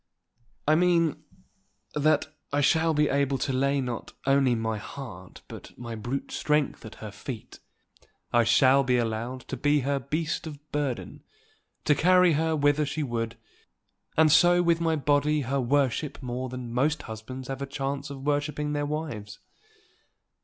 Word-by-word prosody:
"I 155 - +5
mean 170 -2 +3 0.7
that 150 0 +2 0.2
I 145 - +1
shall 160 +3 +3
be 150 0 +3
able 140 -1 +1
to 135 - -2
lay 140 +2 +2
not 125 -3 -5
only 135 -2 +3
my 110 -1 -2
heart 100 -8 -9
but - - -11
my 120 -1 -6
brute 120 +5 -4
strength 150 -1 0
at - - -11
her 105 - -6
feet. 115 +1 -8 0.7
I 120 0 +5
shall 130 +4 +5
be 125 -1 +2
allowed 120 +2 -2
to 135 - -6
be 145 +3 +2
her 140 +2 0
beast 155 +4 -2
of 150 -2 -7
burden, 145 -5 -3 0.6
to 150 - +5
carry 180 +3 +5
her 160 +1 +1
whither 145 0 +3
she 155 +2 -2
would; 115 -3 -3 0.8
and 155 -1 +6
so 175 +3 +6
with 170 -1 +2
my 165 -1 +2
body 150 +1 +2
her 135 +2 -1
to - - +1
worship 140 +2 0
more 125 +1 -3
than 125 -2 -6
most 145 +6 +1
husbands 120 +4 -7
have 135 0 -5
a 140 - -3
chance 140 +1 -3
of 135 -1 -8
worshipping 150 0 -1
their 145 0 -1
wives." 145 -10 -5
140 Hz, 160 wpm, -27 LUFS, 125-150 Hz, 0.8 s, and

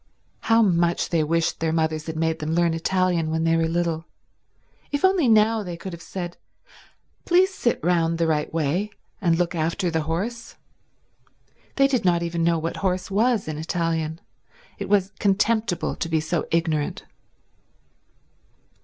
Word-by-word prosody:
How 225 0 +3
much 175 -3 +1
they 165 -2 +2
wished 165 +2 0
their 160 0 0
mothers 160 -1 -1
had 160 - -4
made 160 0 0
them 155 +1 -2
learn 170 -1 +2
Italian 175 -1 0
when 160 0 -1
they 165 0 +3
were 165 0 +2
little. 165 -1 -1 0.9
If 285 +4 +1
only 375 -7 +3
now 220 0 +4
they 175 -4 -6
could 185 +1 -7
have 170 - -9
said, 175 -1 -6 0.9
"Please 370 +2 +3
sit 240 -10 0
round 165 -1 +2
the 165 - +1
right 155 -2 0
way 165 +6 0 0.3
and 170 -3 +2
look 175 +1 0
after 170 +2 -1
the 160 0 0
horse." 230 +8 -3 1.2
They 275 0 +5
did 260 -4 0
not 175 -2 +2
even 170 0 -2
know 170 0 +3
what 165 +1 -3
horse 185 0 -1
was 220 0 +2
in 155 -1 -4
Italian. 165 -1 -2 0.6
It - - -5
was 195 -2 +2
contemptible 205 -1 +1
to 165 - -4
be 160 -1 +2
so 160 +1 -2
ignorant. 160 -3 -1
170 Hz, 160 wpm, -24 LUFS, 160-195 Hz, 1.2 s, They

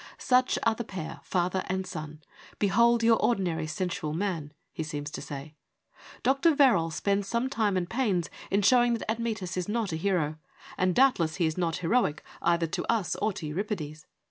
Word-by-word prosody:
' - - -20
Such 255 0 +2
are 230 - +4
the 235 - -4
pair, 185 -7 -6
father 185 +1 0
and 190 0 -2
son: 155 -3 -7 0.3
behold 235 +3 +3
your 230 0 +5
ordinary 175 -8 +1
sensual 175 -1 -3
man,' 165 -4 -2 0.2
he 165 - -4
seems 150 -1 -4
to - - -6
say. 145 +2 -7 0.7
Dr. 275 +5 +3
Verrall 235 - +4
spends 200 +4 0
some 235 +5 -1
time 210 -6 +1
and 175 -1 -1
pains 200 -7 0 0.2
in 200 +1 +2
showing 240 +2 +5
that 230 - -6
Admetus 220 -6 -3
is 180 +1 -2
not 215 -3 -1
a 160 - -2
hero, 160 -4 0 0.4
and, 185 -1 +1
doubtless, 180 -12 +3
he 175 - +1
is 160 0 0
not 170 -3 -1
heroic 190 -7 +1 0.2
either 170 0 +2
to 160 - -3
us 220 -6 0
or 215 +1 0
to 165 - -6
Euripides. 160 -1 -4
185 Hz, 185 wpm, -28 LUFS, 160-230 Hz, 0.7 s, your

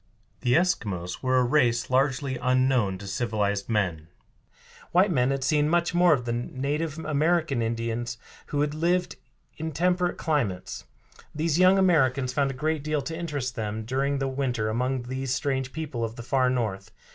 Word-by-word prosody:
The 125 -1 +1
Eskimos 100 - 0
were 130 0 +2
a 125 - +4
race 120 -2 +2
largely 135 0 +1
unknown 130 -6 +2
to 100 - -10
civilized 100 0 -1
men. 90 -8 -1 0.9
White 185 +3 +4
men 125 -5 +2
had 135 -1 -1
seen 150 0 +2
much 170 +1 +1
more 175 0 +5
of 130 -5 +2
the 120 - -1
native 140 +6 -2
American 155 -3 +1
Indians 115 +1 -2 0.3
who 145 0 +1
lived 170 +4 0 0.4
in 160 - -4
more 160 - -5
temperate 180 +1 +1
climates. 100 - -2 0.5
These 160 +1 0
young 185 +1 +6
Americans 135 -9 +3
found 140 -1 +1
a 135 - -5
great 155 +2 -1
deal 150 -2 -1
to 160 +5 -5
interest 145 -7 -3
them 110 -1 -4
during 135 +4 0
the 135 0 -1
winter 130 -5 -1
among 125 +3 -1
these 130 +1 -2
strange 130 +1 -1
people 150 -7 -4
of 115 0 -3
the 120 - -8
far 130 0 +2
North. 110 -6 -2
130 Hz, 170 wpm, -26 LUFS, 120-155 Hz, 0.9 s, young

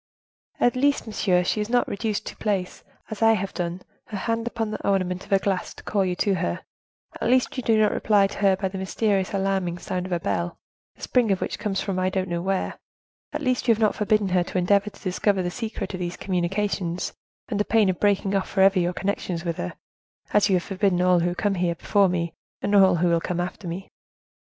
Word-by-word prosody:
"At 245 - +3
least, 285 +2 +2
monsieur, 190 -5 +1
she 210 +4 0
is 210 - -3
not 245 0 +2
reduced 210 +1 -2
to - - -6
place, 195 -4 -2 0.3
as 215 - -6
I 225 0 +6
have 195 -2 -2
done, 175 0 -3 0.2
her 210 - -6
hand 230 +3 -1
upon 225 -2 -2
the - - -5
ornament 185 -2 0
of - - -21
a 195 - +6
glass 190 -1 -2
to - - -13
call 200 -2 +1
you 180 -1 -1
to 200 +2 +1
her; 85 - -2 0.6
at - - +1
least 255 0 +2
you 255 - -2
do 225 -2 +3
not 215 - +4
reply 205 -2 +3
to 195 - -5
her 195 -2 +4
by 190 0 -2
the 190 0 -6
mysterious, 195 0 0
alarming 195 -3 0
sound 180 +1 -3
of - - -10
a 175 - +1
bell, 170 +1 -2 0.4
the - - -16
spring 245 -5 +2
of 190 - +1
which - - -3
comes 195 -2 -1
from 190 -2 -2
I 185 0 +1
don't 185 -1 -2
know 170 0 -1
where; 190 +1 -2 0.5
at - - -4
least 255 -1 0
you 230 - +6
have - - -10
not 215 -2 +3
forbidden 210 -2 +1
her 180 -1 +2
to 180 - -4
endeavor 200 +3 +3
to 200 - -18
discover 190 0 +1
the 175 - -2
secret 225 -1 -5
of 185 - -4
these 175 -1 -4
communications 185 -1 -1 0.4
under 205 -1 +1
pain 215 -1 +3
of 185 -1 0
breaking 200 -1 +2
off 195 - 0
forever 195 -1 +4
your 175 0 0
connections 185 -3 -3
with 170 -1 -2
her, 90 - -4 0.6
as 210 0 +4
you 190 - +4
have 175 - +1
forbidden 195 -2 0
all 180 -1 +4
who 175 +1 0
come 205 +2 0
here 175 -2 0
before 200 +2 +2
me, 170 -2 -2 0.3
and 205 - 0
who 200 - +7 0.3
will 170 -1 +2
come 175 +1 -2
after 180 +1 -4
me." 180 +3 -6
195 Hz, 230 wpm, -24 LUFS, 180-210 Hz, 0.6 s, who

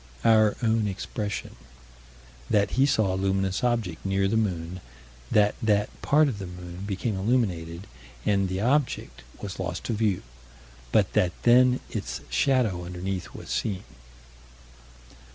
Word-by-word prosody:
Our 110 -2 +5
own 110 -1 +2
expression: 100 - -4 0.9
That 100 -1 +2
he 135 +2 +3
saw 110 -8 +2
a - - -1
luminous 95 +1 0
object 115 -9 0
near 95 0 +1
the 100 - 0
moon: 90 -5 -1 0.5
that 105 -1 +4
that 105 -2 +2
part 150 +1 +4
of 115 -7 -3
the 95 - -5
moon 90 +1 -8
became 105 +2 -2
illuminated, 95 -5 0 0.4
and 100 -2 +2
the 95 +1 -2
object 130 - 0 0.2
was - - -5
lost - - -3
to - - -2
view; 105 -4 0 0.7
but - - +3
that 90 -1 +2
then 125 +1 +5
its - - -4
shadow 120 -10 +2
underneath 90 +1 -5
was - - -8
seen. 100 -3 -1
100 Hz, 135 wpm, -26 LUFS, 95-115 Hz, 0.9 s, Our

